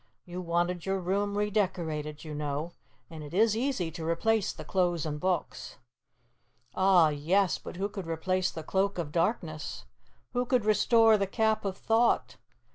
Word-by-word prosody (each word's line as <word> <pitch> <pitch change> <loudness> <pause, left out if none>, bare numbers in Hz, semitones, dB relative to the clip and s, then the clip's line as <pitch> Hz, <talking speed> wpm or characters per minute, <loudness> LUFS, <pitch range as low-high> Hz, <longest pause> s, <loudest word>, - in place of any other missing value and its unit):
You 180 +1 -6
wanted 175 0 -1
your 195 0 0
room 200 +3 -1
re 210 0 0
decorated, 160 -7 -2
you 155 -2 -7
know, 150 +2 -3 0.4
and 160 -2 -9
it 150 +3 -8
is 220 +1 +4
easy 230 -9 -1
to 160 0 -7
replace 200 +6 +1
the - - -10
clothes 175 -4 0
and 150 -1 -3
books." 180 -1 -2 1.0
Ah, 185 -4 +5
yes, 170 +6 +1
but - - -9
who 195 +3 -1
could 200 -4 -7
replace 185 +3 0
the 160 - -7
Cloak 195 +4 0
of 165 -4 -3
Darkness? 165 -3 -2 0.5
Who 245 0 0
could 245 -4 +2
restore 220 +1 +5
the 195 - 0
Cap 220 +1 0
of 195 -1 -2
Thought? 230 +1 +1
185 Hz, 165 wpm, -29 LUFS, 165-205 Hz, 1.0 s, Ah